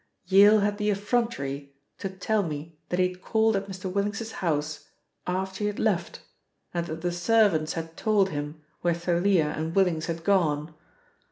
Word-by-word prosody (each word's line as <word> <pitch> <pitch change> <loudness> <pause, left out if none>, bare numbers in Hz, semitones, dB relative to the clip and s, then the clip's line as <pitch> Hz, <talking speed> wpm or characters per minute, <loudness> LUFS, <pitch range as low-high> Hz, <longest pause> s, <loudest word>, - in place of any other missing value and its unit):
Yale 200 +3 +6
had 205 +1 0
the 210 0 +1
effrontery 200 - -1 0.2
to 195 - -3
tell 205 +3 0
me 160 -2 -5
that 180 - -1
he 180 0 +3
had 180 0 -12
called 220 +1 +2
at 195 0 -2
Mr. 190 0 -8
Willings's 200 +4 -2
house 150 -5 -2 0.4
after 190 +1 -2
he 210 - 0
had 205 - -3
left 190 -6 -1 0.5
and 170 -1 -2
that 160 0 -5
the 175 +1 0
servants 175 -3 +3
had 165 0 -6
told 210 -3 +2
him 150 +1 -5 0.2
where 175 -1 +2
Thalia 170 -2 +2
and 160 +2 -3
Willings 175 -5 +2
had 165 -1 -4
gone. 160 -5 +1
180 Hz, 170 wpm, -27 LUFS, 160-200 Hz, 0.5 s, Yale